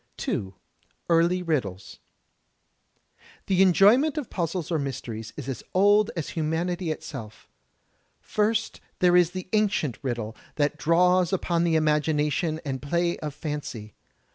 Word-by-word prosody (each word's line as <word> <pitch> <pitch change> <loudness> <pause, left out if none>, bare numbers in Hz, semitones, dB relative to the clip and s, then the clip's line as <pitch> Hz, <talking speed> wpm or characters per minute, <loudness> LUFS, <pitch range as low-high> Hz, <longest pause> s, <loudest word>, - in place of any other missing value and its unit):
2, 95 -1 -3 0.5
Early 170 +2 +3
Riddles 100 - -3 1.5
The 190 -1 +2
enjoyment 210 - +5
of 290 -6 -4
puzzles 170 -1 -3
or 160 - +1
mysteries 120 -5 -5
is 140 -3 -6
as 130 -4 -4
old 205 +2 +5
as 165 -4 -3
hiunanity 165 +2 -2
itself. 110 -8 -8 0.7
First 220 +1 -1 0.2
there 180 -1 +4
is 175 -2 +5
the 185 0 -7
ancient 205 - +1
Riddle, 120 -4 -3 0.2
that 145 0 +1
draws 180 +4 +3
upon 175 -3 0
the 165 -1 +2
imagination 155 0 +1
and 135 -2 -3
play 170 +4 0
of 150 -2 -5
fancy. 140 -8 -6
165 Hz, 125 wpm, -26 LUFS, 140-180 Hz, 1.5 s, enjoyment